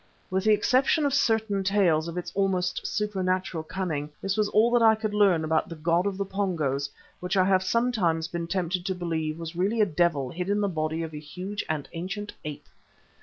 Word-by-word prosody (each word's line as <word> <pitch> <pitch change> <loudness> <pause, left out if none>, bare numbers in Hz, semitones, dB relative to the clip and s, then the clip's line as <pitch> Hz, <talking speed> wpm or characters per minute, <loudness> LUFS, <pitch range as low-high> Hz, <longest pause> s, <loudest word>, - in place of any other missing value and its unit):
With 190 +2 0
the 215 - +5
exception 260 +8 +3
of 280 - +1
certain 220 -7 +1
tales 185 -5 +2
of 170 +1 -6
its 180 - -4
almost 190 -2 0
supernatural 185 -5 -1
cunning, 155 -3 -3
this 195 0 -1
was 210 -1 +1
all 225 +3 +4
that 240 -1 +4
I 220 -1 +6
could 215 -1 -3
learn 195 -6 +4
about 160 0 0
the 165 - -6
god 170 +4 +1
of 195 -2 -2
the 200 - -1
Pongos 160 -9 -1 0.3
which 180 +2 -2
I 185 - +5
have 190 -1 +3
sometimes 185 -6 +1
been 170 -1 -4
tempted 180 0 -1
to 190 - -1
believe 160 -3 -2
was 165 0 -7
really 200 +6 0
a 210 - +6
devil 160 -6 +1
hid 180 +2 -4
in 205 +1 +2
the 205 - +1
body 160 -2 -2
of 160 -1 -6
a 150 - -5
huge 180 +7 -5
and 155 -3 -2
ancient 195 +5 -5
ape. 150 -1 -7
185 Hz, 210 wpm, -27 LUFS, 165-205 Hz, 0.3 s, I